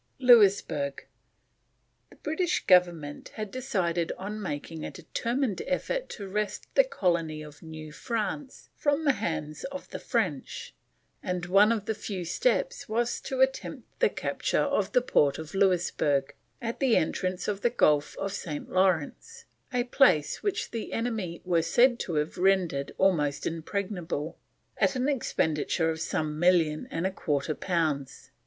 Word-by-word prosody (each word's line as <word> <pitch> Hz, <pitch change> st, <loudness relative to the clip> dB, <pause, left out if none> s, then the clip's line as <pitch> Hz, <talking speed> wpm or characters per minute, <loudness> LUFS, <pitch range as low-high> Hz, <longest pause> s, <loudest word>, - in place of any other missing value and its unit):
LOUISBERG. 200 Hz, -, +4 dB, 1.0 s
The -, -, -17 dB
British 350 Hz, +4 st, -1 dB
Government 175 Hz, -6 st, +3 dB
had 215 Hz, -3 st, -5 dB
decided 180 Hz, -10 st, -1 dB
on 210 Hz, +3 st, -5 dB
making 160 Hz, -2 st, -5 dB
a -, -, -3 dB
determined 230 Hz, -, -2 dB
effort -, -, -1 dB
to 200 Hz, -3 st, -7 dB
wrest 210 Hz, +1 st, -2 dB
the -, -, +6 dB
Colony 170 Hz, -, -1 dB
of 150 Hz, 0 st, -12 dB
New 155 Hz, -1 st, -9 dB
France 230 Hz, -, -4 dB
from 290 Hz, +2 st, 0 dB
the 285 Hz, -, +6 dB
hands 155 Hz, -, -3 dB
of 280 Hz, 0 st, -6 dB
the -, -, -5 dB
French, -, -, -2 dB, 0.5 s
and 180 Hz, -2 st, -2 dB
one 200 Hz, +4 st, +5 dB
of 215 Hz, -3 st, -1 dB
the 220 Hz, -, 0 dB
few 200 Hz, -4 st, -5 dB
steps -, -, 0 dB
was 235 Hz, +2 st, 0 dB
to 265 Hz, -1 st, -2 dB
attempt 265 Hz, 0 st, -1 dB
the 485 Hz, -, +4 dB
capture -, -, -1 dB
of 210 Hz, -9 st, 0 dB
the 250 Hz, -, +4 dB
port 145 Hz, -, +3 dB
of 160 Hz, -1 st, -8 dB
Louisburg, 175 Hz, -7 st, +2 dB, 0.3 s
at 235 Hz, -2 st, -4 dB
the 265 Hz, -4 st, +4 dB
entrance 185 Hz, +3 st, -1 dB
to 210 Hz, -, +1 dB
the 200 Hz, +4 st, 0 dB
Gulf 150 Hz, -10 st, +2 dB
of 195 Hz, 0 st, -3 dB
St. 150 Hz, -7 st, -5 dB
Lawrence; 190 Hz, -, 0 dB, 0.3 s
a 250 Hz, -2 st, +1 dB
place 245 Hz, -, +3 dB
which 405 Hz, -1 st, -2 dB
the 230 Hz, -, -5 dB
enemy 220 Hz, -7 st, -3 dB
were 175 Hz, -2 st, +3 dB
said 240 Hz, +9 st, +4 dB
to 170 Hz, -, -3 dB
have 150 Hz, +4 st, -1 dB
rendered 180 Hz, -7 st, +2 dB
almost 150 Hz, -7 st, +2 dB
impregnable 170 Hz, -2 st, -3 dB, 0.4 s
at -, -, +3 dB
an 255 Hz, +1 st, 0 dB
expenditure 160 Hz, -, 0 dB
of 160 Hz, 0 st, -5 dB
some 155 Hz, -1 st, -2 dB
million 170 Hz, -3 st, +3 dB
and 165 Hz, -, -2 dB
a 190 Hz, -, +1 dB
quarter 150 Hz, -4 st, -1 dB
pounds. 155 Hz, -6 st, -2 dB
190 Hz, 150 wpm, -28 LUFS, 160-240 Hz, 1.0 s, the